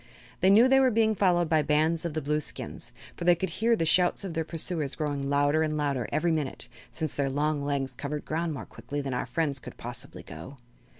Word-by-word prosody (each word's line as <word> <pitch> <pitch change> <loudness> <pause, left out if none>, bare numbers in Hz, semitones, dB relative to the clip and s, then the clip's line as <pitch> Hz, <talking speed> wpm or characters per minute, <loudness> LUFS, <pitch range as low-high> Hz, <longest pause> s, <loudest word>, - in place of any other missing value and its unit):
They 185 - +4
knew 220 +6 +7
they 270 +1 +5
were 265 -1 +5
being 220 -1 +3
followed 180 -4 +2
by 160 -1 +3
bands 155 +3 +1
of 165 -3 -3
the 155 - -2
Blueskins, 150 +1 -3 0.2
for - - -6
they 175 0 +5
could 190 +2 -3
hear 230 +1 +2
the 165 - 0
shouts 175 +4 +3
of 190 -4 -5
their 165 -1 -1
pursuers 160 -3 -2
growing 145 -3 -2
louder 145 +2 +2
and 155 -1 0
louder 140 -5 -1
every 170 +2 +1
minute, 150 -4 -2 0.2
since 160 -3 -4
their 140 -1 0
long 145 +1 0
legs 140 -2 -1
covered 150 +1 -5
the - - -33
ground 165 +1 -1
more 145 - -6
quickly 145 - -6
than 135 -2 -4
our 125 - -2
friends 145 -5 -1
could - - -11
possibly 125 +3 -9
go. 140 +1 -10
155 Hz, 225 wpm, -28 LUFS, 145-175 Hz, 0.2 s, knew